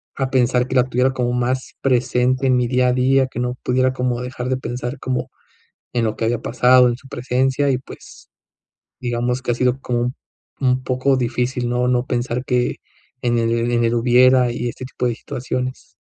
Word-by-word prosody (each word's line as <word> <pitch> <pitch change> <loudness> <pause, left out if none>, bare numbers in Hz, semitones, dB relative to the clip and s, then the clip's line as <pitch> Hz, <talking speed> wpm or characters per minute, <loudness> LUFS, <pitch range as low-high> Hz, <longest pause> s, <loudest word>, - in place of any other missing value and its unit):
a 135 -1 -1
pensar 125 -1 +2
que 130 - -4
la 125 0 +4
tuviera 125 +1 +1
como 125 -1 -1
más 125 +1 -1
presente 130 0 +1
en 130 - +4
mi 125 -1 +1
día 125 0 +2
a - - +2
día, 130 +1 +3
que 125 - -7
no 125 0 -1
pudiera 130 +1 +2
como 125 -1 -2
dejar 125 0 -5
de 130 - 0
pensar, 125 +1 -5
como, 130 -1 -3 0.6
en 120 -1 +1
lo 110 - -1
que 115 - -1
había 120 0 0
pasado 125 +1 +4
en 120 - -2
su 135 - -16
presencia, 130 +3 0
y 125 - +1
pues, - - -14 0.7
digamos 120 0 -1
que 120 - 0
ha - - 0
sido 125 +2 0
como 120 -2 -1
un 125 +1 -2 0.5
un 130 -1 +1
poco 130 +1 +1
difícil, 125 0 -1
¿no?, 125 +1 0
no 125 0 +1
pensar 125 0 -2
que, 125 -1 0 0.5
en 120 -1 +1
el 115 +1 0
en 120 0 +2
el 115 +1 +1
hubiera 125 +1 +4
y 120 0 -3
este 130 - -7
tipo 125 -1 -3
de 120 - 0
situaciones. 125 +2 -5
125 Hz, 200 wpm, -20 LUFS, 120-130 Hz, 0.7 s, la